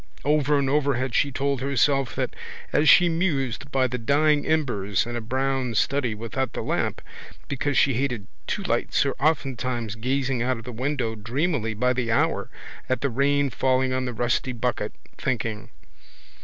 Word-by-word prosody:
Over 150 Hz, 0 st, +3 dB
and 140 Hz, -1 st, +1 dB
over 140 Hz, 0 st, +2 dB
had 130 Hz, 0 st, -2 dB
she 140 Hz, +3 st, +2 dB
told 140 Hz, 0 st, -1 dB
herself 135 Hz, -1 st, +1 dB
that -, -, -2 dB, 0.4 s
as 150 Hz, +1 st, +4 dB
she 175 Hz, -, +8 dB
mused 140 Hz, -, -1 dB
by 130 Hz, -1 st, +2 dB
the 125 Hz, 0 st, -2 dB
dying 145 Hz, +4 st, +2 dB
embers 120 Hz, -11 st, +1 dB
in 120 Hz, 0 st, -5 dB
a 120 Hz, -, -2 dB
brown 130 Hz, 0 st, -1 dB
study 125 Hz, -2 st, +1 dB
without 115 Hz, +4 st, -3 dB
the -, -, -3 dB
lamp -, -, -1 dB, 0.4 s
because 140 Hz, 0 st, -1 dB
she 135 Hz, -, +4 dB
hated 120 Hz, -4 st, -1 dB, 0.2 s
two -, -, -2 dB
lights -, -, +1 dB
or -, -, 0 dB
oftentimes 130 Hz, -6 st, 0 dB
gazing 130 Hz, +2 st, -1 dB
out 125 Hz, 0 st, 0 dB
of 115 Hz, -, -9 dB
the 125 Hz, -, -7 dB
window 125 Hz, -1 st, -2 dB
dreamily 115 Hz, +1 st, -1 dB
by 125 Hz, +4 st, +2 dB
the 120 Hz, -2 st, -1 dB
hour -, -, +1 dB, 0.4 s
at 130 Hz, -1 st, 0 dB
the 140 Hz, -, 0 dB
rain 140 Hz, +2 st, +2 dB
falling 130 Hz, +1 st, +1 dB
on 130 Hz, 0 st, -1 dB
the 125 Hz, -, -3 dB
rusty 120 Hz, +2 st, 0 dB
bucket, 125 Hz, +1 st, -2 dB, 0.2 s
thinking. 115 Hz, -4 st, -2 dB
130 Hz, 170 wpm, -25 LUFS, 120-140 Hz, 0.4 s, she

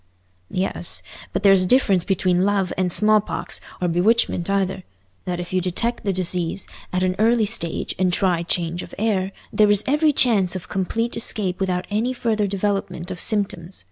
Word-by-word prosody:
"Yes; 185 Hz, -2 st, -2 dB, 0.3 s
but -, -, -3 dB
there's 195 Hz, -1 st, +6 dB
this 185 Hz, -, +1 dB
difference 200 Hz, -7 st, +3 dB
between 185 Hz, -2 st, +1 dB
love 195 Hz, -2 st, +1 dB
and 180 Hz, -1 st, 0 dB
smallpox, 215 Hz, +2 st, +1 dB, 0.2 s
or 180 Hz, -, 0 dB
bewitchment 180 Hz, +1 st, +2 dB
either—that 180 Hz, -, -4 dB
if 175 Hz, +1 st, -6 dB
you 185 Hz, -, +2 dB
detect 230 Hz, +7 st, -1 dB
the 200 Hz, -, 0 dB
disease 180 Hz, 0 st, 0 dB, 0.2 s
at 180 Hz, 0 st, 0 dB
an 185 Hz, 0 st, +1 dB
early 225 Hz, 0 st, +3 dB
stage 200 Hz, -6 st, -1 dB
and 185 Hz, -1 st, +2 dB
try 180 Hz, -2 st, +1 dB
change 170 Hz, 0 st, -2 dB
of -, -, -10 dB
air, 195 Hz, -3 st, 0 dB, 0.2 s
there 210 Hz, -1 st, +4 dB
is 205 Hz, 0 st, +3 dB
every 300 Hz, +3 st, +3 dB
chance 210 Hz, -10 st, +3 dB
of 185 Hz, -, -6 dB
complete 225 Hz, +5 st, -2 dB
escape 205 Hz, -5 st, -1 dB
without 185 Hz, -2 st, -1 dB
any 225 Hz, +5 st, 0 dB
further 220 Hz, -4 st, 0 dB
development 195 Hz, -3 st, -2 dB
of 180 Hz, -, -6 dB
symptoms. 195 Hz, -4 st, -1 dB
190 Hz, 170 wpm, -22 LUFS, 180-210 Hz, 0.3 s, there's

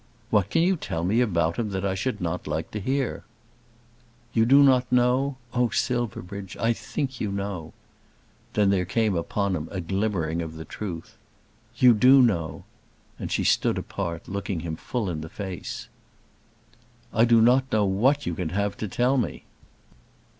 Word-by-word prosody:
"What 105 Hz, -4 st, +3 dB
can 165 Hz, -, +2 dB
you 185 Hz, +1 st, +2 dB
tell 85 Hz, -, -4 dB
me 105 Hz, +7 st, +2 dB
about 85 Hz, -8 st, +1 dB
him, 115 Hz, -3 st, -1 dB
that 95 Hz, 0 st, -3 dB
I 95 Hz, -, +1 dB
should 125 Hz, +7 st, -2 dB
not 90 Hz, 0 st, -3 dB
like 80 Hz, +1 st, -3 dB
to 105 Hz, -, -4 dB
hear?" 130 Hz, +4 st, -1 dB, 1.1 s
"You 115 Hz, 0 st, +3 dB
do 140 Hz, +3 st, +7 dB
not 130 Hz, -2 st, +4 dB
know? 125 Hz, +2 st, +2 dB, 0.2 s
Oh, 125 Hz, -1 st, +2 dB
Silverbridge, 100 Hz, -7 st, -3 dB
I 115 Hz, +1 st, +2 dB
think 130 Hz, +2 st, -4 dB
you 105 Hz, -, -1 dB
know." 100 Hz, -5 st, -4 dB, 0.8 s
Then 105 Hz, -2 st, +3 dB
there 95 Hz, -2 st, +2 dB
came 105 Hz, +2 st, +1 dB
upon 95 Hz, +3 st, -1 dB
him 80 Hz, -1 st, -4 dB
a 95 Hz, -, -4 dB
glimmering 90 Hz, -3 st, -1 dB
of 80 Hz, -1 st, -6 dB
the 80 Hz, 0 st, -8 dB
truth. 85 Hz, -2 st, -7 dB, 0.6 s
"You 125 Hz, 0 st, +7 dB
do 130 Hz, +5 st, +6 dB
know." 80 Hz, -10 st, 0 dB, 0.6 s
And -, -, -5 dB
she -, -, 0 dB
stood -, -, +2 dB
apart 85 Hz, -1 st, -4 dB
looking 100 Hz, -3 st, -3 dB
him 80 Hz, -1 st, -4 dB
full 115 Hz, +5 st, -3 dB
in 80 Hz, -4 st, -3 dB
the 80 Hz, -, -7 dB
face. 95 Hz, -2 st, -6 dB, 1.3 s
"I 110 Hz, -, +4 dB
do 115 Hz, -1 st, +5 dB
not 130 Hz, +3 st, +4 dB
know 105 Hz, -1 st, +3 dB
what 125 Hz, +10 st, +2 dB
you 85 Hz, -, -1 dB
can 85 Hz, -1 st, -3 dB
have 100 Hz, +3 st, -1 dB
to 110 Hz, -, -3 dB
tell 125 Hz, +7 st, +1 dB
me." 120 Hz, -, -2 dB
100 Hz, 170 wpm, -25 LUFS, 90-125 Hz, 1.3 s, do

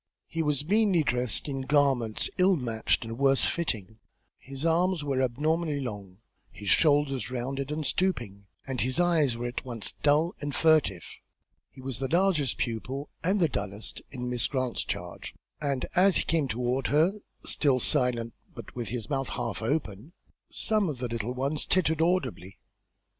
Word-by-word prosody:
He 165 Hz, -, -3 dB
was 150 Hz, -2 st, 0 dB
meanly 200 Hz, -3 st, +3 dB
dressed 125 Hz, -1 st, +1 dB
in 135 Hz, -2 st, -3 dB
garments 135 Hz, -5 st, +2 dB
ill 185 Hz, +1 st, +5 dB
matched 120 Hz, -7 st, 0 dB
and 115 Hz, +2 st, -6 dB
worse 135 Hz, -1 st, +4 dB
fitting; 110 Hz, -, -2 dB, 0.4 s
his 135 Hz, +3 st, -6 dB
arms 170 Hz, 0 st, +2 dB
were 135 Hz, -2 st, 0 dB
abnormally 150 Hz, +4 st, 0 dB
long, 100 Hz, -8 st, -6 dB, 0.3 s
his 100 Hz, -2 st, -6 dB
shoulders 145 Hz, -6 st, +3 dB
rounded 135 Hz, +2 st, -3 dB
and 155 Hz, 0 st, -2 dB
stooping, 120 Hz, -, -1 dB, 0.2 s
and 130 Hz, -2 st, -3 dB
his 130 Hz, +4 st, 0 dB
eyes 160 Hz, -8 st, +3 dB
were 120 Hz, -, -4 dB
at 120 Hz, 0 st, -4 dB
once 120 Hz, -5 st, -5 dB
dull 150 Hz, +4 st, +3 dB
and 145 Hz, -1 st, -3 dB
furtive. 155 Hz, -, +3 dB, 0.6 s
He 130 Hz, -, -14 dB
was 130 Hz, -2 st, -5 dB
the 135 Hz, -, -1 dB
largest 170 Hz, -5 st, +2 dB
pupil, 130 Hz, +5 st, -3 dB
and 190 Hz, +4 st, +2 dB
the 170 Hz, -, +4 dB
dullest, 105 Hz, -5 st, -5 dB
in 125 Hz, -2 st, -5 dB
Miss 125 Hz, -1 st, +1 dB
Grant's 130 Hz, -3 st, -1 dB
charge, 90 Hz, 0 st, -6 dB, 0.3 s
and 140 Hz, -3 st, -1 dB
as 190 Hz, +1 st, +5 dB
he -, -, +1 dB
came 160 Hz, -4 st, +1 dB
toward 125 Hz, +2 st, -1 dB
her, 165 Hz, +8 st, +2 dB, 0.3 s
still 135 Hz, -4 st, +2 dB
silent, 120 Hz, -2 st, +2 dB, 0.2 s
but -, -, -10 dB
with 120 Hz, -5 st, -4 dB
his 115 Hz, -2 st, -4 dB
mouth 135 Hz, -1 st, -1 dB
half -, -, -3 dB
open, 120 Hz, -, -2 dB, 0.4 s
some 215 Hz, -5 st, +1 dB
of 145 Hz, -, -4 dB
the 125 Hz, 0 st, -3 dB
little 115 Hz, +1 st, -3 dB
ones 140 Hz, +3 st, -1 dB
tittered 160 Hz, -4 st, +2 dB
audibly. 130 Hz, -, 0 dB
135 Hz, 165 wpm, -28 LUFS, 120-155 Hz, 0.6 s, ill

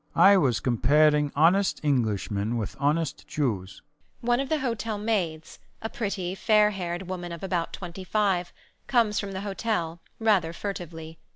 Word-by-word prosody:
I 200 Hz, +1 st, +7 dB
was 135 Hz, -, +2 dB
comparing 150 Hz, +4 st, +3 dB
honest 180 Hz, +7 st, +3 dB
Englishmen 110 Hz, -5 st, 0 dB
with 110 Hz, -, -4 dB
honest 150 Hz, +1 st, 0 dB
Jews. 100 Hz, -10 st, -2 dB, 0.4 s
One 240 Hz, +1 st, +2 dB
of 275 Hz, -1 st, -2 dB
the 315 Hz, -, +2 dB
hotel 230 Hz, -5 st, -2 dB
maids, 185 Hz, -8 st, -2 dB, 0.2 s
a 225 Hz, -, -4 dB
pretty, 195 Hz, -6 st, -3 dB
fair 210 Hz, +1 st, +4 dB
haired 175 Hz, -2 st, -4 dB
woman 175 Hz, -1 st, -5 dB
of 170 Hz, +1 st, -7 dB
about 180 Hz, -3 st, -1 dB
25, 185 Hz, 0 st, -1 dB, 0.4 s
comes 230 Hz, -5 st, +2 dB
from 200 Hz, -1 st, -4 dB
the 190 Hz, -, -4 dB
hotel, 195 Hz, -5 st, -2 dB, 0.2 s
rather 200 Hz, -7 st, +2 dB
furtively. 165 Hz, -4 st, -6 dB
175 Hz, 145 wpm, -26 LUFS, 155-205 Hz, 0.4 s, I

